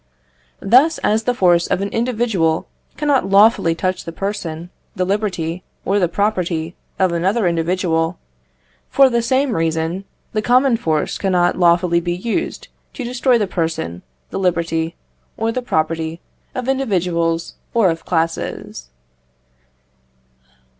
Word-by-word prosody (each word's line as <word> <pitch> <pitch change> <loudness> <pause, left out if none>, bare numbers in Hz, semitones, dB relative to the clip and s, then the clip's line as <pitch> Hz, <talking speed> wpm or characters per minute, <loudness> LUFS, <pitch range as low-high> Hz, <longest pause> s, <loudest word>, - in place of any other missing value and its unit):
Thus, 265 +10 +5
as 220 +1 +1
the 245 - +2
force 175 -4 +3
of - - 0
an 200 +1 -2
individual 225 -9 0 0.3
cannot 285 -9 +1
lawfully 200 -4 +5
touch 185 +2 -2
the 165 - -6
person, 175 -3 -4 0.2
the 185 -2 0
liberty, 185 -4 -2 0.2
or 200 +2 +2
the 180 - +3
property 175 -4 -1 0.2
of 185 -2 +2
another 190 +6 +1
individual 170 0 0 0.7
for 270 -2 +5
the 235 0 +2
same 260 +1 +1
reason, 165 +3 -1 0.3
the 215 - 0
common 250 +2 +4
force 160 -9 -1
cannot 180 -3 +2
lawfully 170 0 +4
be 175 0 -2
used 230 - -3 0.3
to 265 - -5
destroy 250 +1 +2
the 210 - +1
person, 160 - -3 0.3
the - - -3
liberty, 170 -2 0 0.4
or 225 +1 0
the 255 - -2
property 160 -5 -1 0.4
of 255 -1 -3
individuals 175 -10 0 0.2
or 210 -7 +4
of 165 0 -6
classes. 165 - -3
185 Hz, 130 wpm, -19 LUFS, 165-225 Hz, 0.7 s, Thus